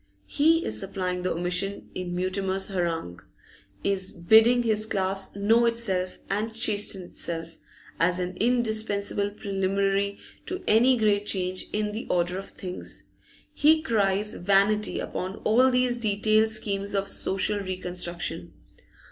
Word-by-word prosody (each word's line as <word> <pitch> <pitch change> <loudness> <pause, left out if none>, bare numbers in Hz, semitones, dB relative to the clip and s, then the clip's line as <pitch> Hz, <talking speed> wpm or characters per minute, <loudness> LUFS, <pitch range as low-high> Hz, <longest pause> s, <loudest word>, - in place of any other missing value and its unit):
He 325 - +2
is - - -1
supplying 185 -2 -3
the 185 - -1
omission 180 +3 -2
in 180 -1 -4
Mutimer's 190 +2 -1
harangue, 165 - -3 0.6
is 190 -1 +1
bidding 225 +7 +5
his 215 -1 0
class 195 -1 -1
know 225 +4 +3
itself 195 -6 0
and 210 +3 -2
chasten 205 -4 +1
itself, 165 -1 -3 0.4
as 175 +2 +2
an 180 0 -3
indispensable 220 -4 +1
preliminary 200 0 -1 0.3
to 370 +1 -5
any 245 +4 +5
great 205 -2 +1
change 185 -1 -2
in 210 0 -1
the 220 +3 -6
order 180 +1 0
of 195 - -9
things. 180 -1 -8 0.5
He 315 +1 +4
cries 210 -5 +1
vanity 200 +3 +2
upon 185 +1 -4
all 250 +4 +4
these 250 -1 +1
detailed 215 0 +2
schemes 200 -2 -2
of 195 0 0
social 195 +2 -1
reconstruction. 180 - -3
200 Hz, 130 wpm, -26 LUFS, 185-220 Hz, 0.6 s, bidding